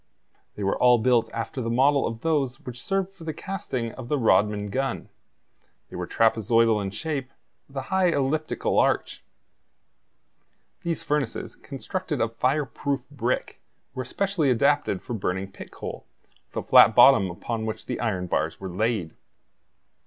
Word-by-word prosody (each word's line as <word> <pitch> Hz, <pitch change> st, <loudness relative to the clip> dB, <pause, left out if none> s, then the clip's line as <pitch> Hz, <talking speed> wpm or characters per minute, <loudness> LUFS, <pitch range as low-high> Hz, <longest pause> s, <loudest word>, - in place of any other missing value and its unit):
They 105 Hz, -, -5 dB
were 95 Hz, -, 0 dB
all 125 Hz, -1 st, +6 dB
built 115 Hz, -1 st, +2 dB
after 115 Hz, +4 st, -4 dB
the 115 Hz, -, -2 dB
model 135 Hz, +4 st, +3 dB
of 115 Hz, 0 st, -6 dB
those 140 Hz, -5 st, 0 dB
which 125 Hz, -1 st, -8 dB
served 195 Hz, -1 st, -1 dB
for 185 Hz, -, -13 dB
the 160 Hz, -2 st, -4 dB
casting 160 Hz, -, -4 dB
of 130 Hz, 0 st, -9 dB
the 150 Hz, -, 0 dB
Rodman 105 Hz, -3 st, +2 dB
gun; 135 Hz, +4 st, -2 dB, 0.8 s
they -, -, -8 dB
were -, -, -4 dB
trapezoidal 115 Hz, 0 st, +3 dB
in 100 Hz, -, -2 dB
shape, 135 Hz, +5 st, -4 dB, 0.4 s
with 140 Hz, -, -12 dB
a -, -, 0 dB
high 190 Hz, -1 st, +4 dB
elliptical 155 Hz, 0 st, 0 dB
arch. -, -, 0 dB, 1.6 s
These 170 Hz, -2 st, -3 dB
furnaces, 145 Hz, -5 st, -2 dB
constructed 150 Hz, +2 st, -5 dB
of 115 Hz, 0 st, -1 dB
fireproof 140 Hz, 0 st, -1 dB
brick, 125 Hz, -3 st, -2 dB, 0.3 s
were 130 Hz, -, -4 dB
especially 170 Hz, +3 st, 0 dB
adapted 135 Hz, -5 st, +2 dB
for 120 Hz, -, -5 dB
burning 95 Hz, -2 st, -2 dB
pit -, -, -10 dB
coal, -, -, -8 dB, 0.4 s
with -, -, -5 dB
a -, -, -32 dB
flat -, -, +7 dB
bottom 95 Hz, -1 st, +7 dB
upon 110 Hz, +5 st, -4 dB
which 110 Hz, 0 st, -5 dB
the 125 Hz, -, -4 dB
iron 100 Hz, -6 st, -1 dB
bars 80 Hz, -2 st, -1 dB
were 95 Hz, -, -6 dB
laid. 100 Hz, -3 st, -1 dB
125 Hz, 155 wpm, -25 LUFS, 110-145 Hz, 1.6 s, flat